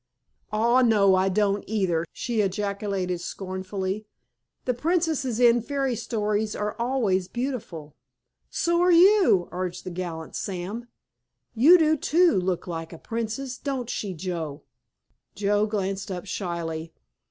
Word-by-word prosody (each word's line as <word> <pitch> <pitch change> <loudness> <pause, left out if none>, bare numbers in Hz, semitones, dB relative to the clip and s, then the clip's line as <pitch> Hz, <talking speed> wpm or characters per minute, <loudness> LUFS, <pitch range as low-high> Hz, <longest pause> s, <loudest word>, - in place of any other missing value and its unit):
"Aw, 235 +4 +3
no 210 -5 +5
I 190 +1 +3
don't, 200 +1 +1
either!" 185 -6 0
she 235 -3 -1
ejaculated 195 -2 -2
scornfully. 190 +2 -4 0.6
"The 250 - +1
princesses 300 -4 0
in 240 -1 +5
fairy 270 0 -1
stories 215 -1 -1
are 210 0 -2
always 230 -7 +1
beautiful." 205 - -5 0.6
"So're 345 +1 +2
you," 360 - +6
urged 180 0 -4
the 185 - -6
gallant 170 -3 -5
Sam. 200 +5 -4 0.7
"You 290 +11 +7
do, 315 -2 +3
too, 335 - +3
look 180 -1 -1
like 165 -2 -5
a 165 - -9
princess, 230 +6 -4
don't 265 -4 -3
she, 195 -4 -3
Joe?" 160 -4 -4 0.7
Joe 205 +1 +1
glanced 195 -2 -2
up 180 -1 -5
shyly. 170 -4 -4
205 Hz, 125 wpm, -25 LUFS, 185-245 Hz, 0.7 s, You